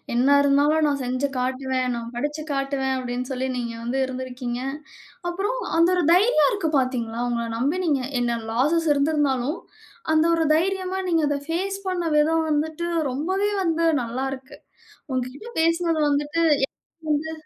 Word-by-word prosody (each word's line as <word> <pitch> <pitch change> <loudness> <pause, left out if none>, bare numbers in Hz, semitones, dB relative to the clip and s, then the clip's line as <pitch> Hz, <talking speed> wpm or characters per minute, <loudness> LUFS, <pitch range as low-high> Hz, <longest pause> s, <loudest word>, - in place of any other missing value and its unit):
"என்ன 270 +4 +4
இருந்தாலும் 290 +2 +3
நான் 280 -2 0
செஞ்சு 255 +3 0
காட்டுவேன். 255 0 -1
நான் 235 0 -6
படிச்சு 295 +4 -3
காட்டுவேன்" 275 -1 -1
அப்பிடீன்னு 250 0 -4
சொல்லி 260 0 -2
நீங்க 235 -1 -3
வந்து 255 +3 -1
இருந்திருக்கீங்க. 255 -1 -5 0.7
அப்புறம் 410 +8 -2 0.2
அந்த 340 +2 +5
1 360 - +1
தைரியம் 360 - +4
இருக்கு. 365 -6 -1
பார்த்தீர்களா? 240 -3 -2
உங்கள 235 -1 -1
நம்பி 290 +9 0
நீங்க 285 -5 +2 0.2
என்ன, 235 -1 0
லாஸஸ் 305 +7 +2
இருந்திருந்தாலும், 285 -1 +1 0.5
அந்த 315 +1 +4
ஒரு 325 -1 +1
தைரியமா, 375 +2 0
நீங்க 325 -2 +2
அதை 285 -1 0
பேஸ் 390 +4 -1
பண்ண 360 -2 -1
விதம் 320 +2 +3
வந்துட்டு 315 +3 -1 0.2
ரொம்பவே 380 +9 0
வந்து 330 -1 +1 0.2
நல்லாருக்கு. 260 +3 -5 0.6
உங்ககிட்ட 255 - -4
பேசினது 330 -1 +1
வந்துட்டு, 295 +3 0 0.2
எனக்கு 325 +3 -30
வந்து 310 +2 -1
285 Hz, 145 wpm, -24 LUFS, 255-330 Hz, 0.7 s, அந்த